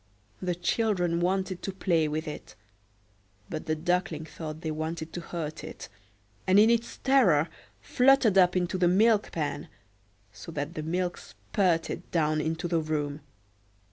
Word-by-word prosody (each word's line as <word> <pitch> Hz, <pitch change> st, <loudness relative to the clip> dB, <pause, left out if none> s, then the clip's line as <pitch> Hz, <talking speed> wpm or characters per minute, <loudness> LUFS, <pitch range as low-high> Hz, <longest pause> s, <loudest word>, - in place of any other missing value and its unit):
The 180 Hz, -2 st, -1 dB
children 175 Hz, -1 st, 0 dB
wanted 185 Hz, +1 st, -1 dB
to 195 Hz, -, -3 dB
play 170 Hz, -4 st, +1 dB
with 155 Hz, +2 st, -3 dB
it; 150 Hz, -, -8 dB, 1.0 s
but 155 Hz, -, -5 dB
the 155 Hz, -, +1 dB
Duckling 175 Hz, -1 st, -1 dB
thought 155 Hz, -1 st, -7 dB
they 160 Hz, -, -3 dB
wanted 160 Hz, +1 st, -4 dB
to 175 Hz, -, -4 dB
hurt 160 Hz, -2 st, -5 dB
it, -, -, -8 dB, 0.6 s
and 185 Hz, +1 st, +5 dB
in 220 Hz, +2 st, +6 dB
its 235 Hz, 0 st, -1 dB
terror 195 Hz, -, +4 dB, 0.4 s
fluttered 250 Hz, -, +4 dB
up 180 Hz, -1 st, +5 dB
into 180 Hz, +1 st, -1 dB
the 180 Hz, -, +4 dB
milk 210 Hz, +3 st, +3 dB
pan, 145 Hz, -3 st, -3 dB, 0.7 s
so 165 Hz, -, -9 dB
that 145 Hz, +2 st, -3 dB
the 155 Hz, -, -4 dB
milk 175 Hz, +3 st, -2 dB
spurted 165 Hz, -, -1 dB
down 155 Hz, -2 st, +1 dB
into 160 Hz, +2 st, -2 dB
the 170 Hz, -1 st, +1 dB
room. 150 Hz, -1 st, -2 dB
170 Hz, 150 wpm, -28 LUFS, 155-185 Hz, 1.0 s, in